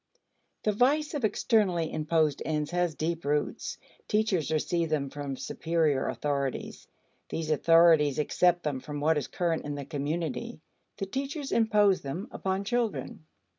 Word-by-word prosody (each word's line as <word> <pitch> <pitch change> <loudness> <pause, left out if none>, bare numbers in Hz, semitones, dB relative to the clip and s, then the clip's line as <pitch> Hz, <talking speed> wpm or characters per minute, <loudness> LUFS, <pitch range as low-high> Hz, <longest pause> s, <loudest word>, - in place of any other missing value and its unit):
The 215 - +2
vice 285 +9 +2
of 290 -4 -3
externally 200 -7 +1
imposed 155 -2 +1
ends 150 0 -2
has 175 -3 0
deep 165 +2 -2
roots. 145 +1 -1 0.3
Teachers 210 -8 +1
receive 165 +1 0
them 140 -3 -1
from 140 -2 -5
superior 160 -4 0
authorities; 140 -2 -3 0.4
these 160 -1 -3
authorities 160 -2 +5
accept 175 +3 +2
them 145 -4 -1
from 145 +2 -6
what 155 +1 +2
is - - -5
current 170 -2 -1
in 145 0 -4
the 140 -1 -5
community. 150 +1 -3 0.4
The 195 - -2
teachers 275 - -4
impose 210 -4 +3
them 170 - -5
upon 190 +1 -2
children. 200 - -2
165 Hz, 140 wpm, -29 LUFS, 150-195 Hz, 0.4 s, authorities